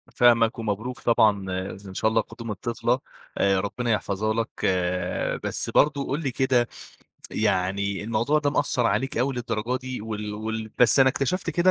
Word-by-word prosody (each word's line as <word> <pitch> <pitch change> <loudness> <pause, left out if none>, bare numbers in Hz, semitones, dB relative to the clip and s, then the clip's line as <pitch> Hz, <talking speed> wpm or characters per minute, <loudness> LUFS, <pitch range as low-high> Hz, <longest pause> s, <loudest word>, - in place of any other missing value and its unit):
فاهمك 115 -1 +4
ومبروك 115 +4 -3
طبعًا 105 -5 +3 0.4
إن 95 - -9
شاء 110 - +1
الله 115 - +3
قدوم 115 -1 -8
الطفلة 120 +3 -1 0.4
آآ، 95 -1 +3
ربنا 115 +4 -2
يحفَظها 110 0 0
لك، 115 0 -3 0.8
بس - - -1
برضه 145 -2 +2
قُل 140 +4 -1
لي 135 - -1
كده، 125 -2 +2 0.6
يعني 100 +2 0
الموضوع 115 +7 +1
ده 145 -1 0
مأثّر 125 -4 +1
عليك 115 +5 0
اوي 130 +2 +1
للدرجة 120 0 -2
دي 130 -2 -6
وال 105 -1 -5
وال 110 +1 -4
بس 125 +3 +6
أنا 130 - +7
اكتشفت 165 +6 -1
كده 175 +3 +3
115 Hz, 160 wpm, -25 LUFS, 105-130 Hz, 0.8 s, أنا